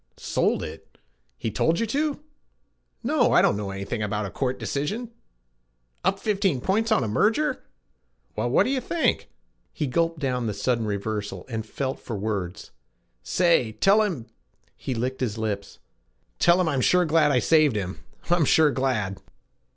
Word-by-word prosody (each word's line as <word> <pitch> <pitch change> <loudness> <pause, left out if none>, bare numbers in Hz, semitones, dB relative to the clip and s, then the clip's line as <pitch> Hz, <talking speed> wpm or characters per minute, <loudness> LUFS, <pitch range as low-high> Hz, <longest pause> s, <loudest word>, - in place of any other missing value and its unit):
Sold - - 0
it! - - -10 0.4
He 110 - -3
told 165 - +1
you 230 - +1
to! 290 +5 -1 0.8
No, - - +2
I - - +6
dunno 100 0 +1
anything 100 +3 -4
about 105 0 -1
a 100 - -6
court 130 -1 -2
decision. 210 - -3 0.9
Up 195 - +2
15 195 -8 0
points 215 - 0
on 215 - +3
a - - -1
merger! 230 - +1 0.7
Well 120 - -1
what 125 - +4
do 255 - -1
you 265 -2 0
think 335 +4 0 0.2
' - - -45
He 150 - -2
gulped 165 +5 0
down 125 -5 -1
the 105 - -2
sudden 115 -4 0
reversal 105 0 -3
and 110 -2 -4
felt 135 +3 -3
for 115 - -6
words. 100 -3 -4 0.5
'Say, 165 - +2
tell 200 - +4
him, 175 - -2 0.3
' - - -42
he 130 - -4
licked 125 +3 -3
his 115 -4 -1
lips, 105 -3 -4 0.6
'tell 175 +1 +5
him 180 - +2
I'm 140 -4 +1
sure 180 +6 +4
glad 155 -1 +3
I 140 - +3
saved 155 -1 +4
him. 95 -2 -4 0.3
I'm 175 -3 +4
sure 155 +1 +5
glad.' 115 -7 -1
130 Hz, 165 wpm, -25 LUFS, 110-180 Hz, 0.9 s, I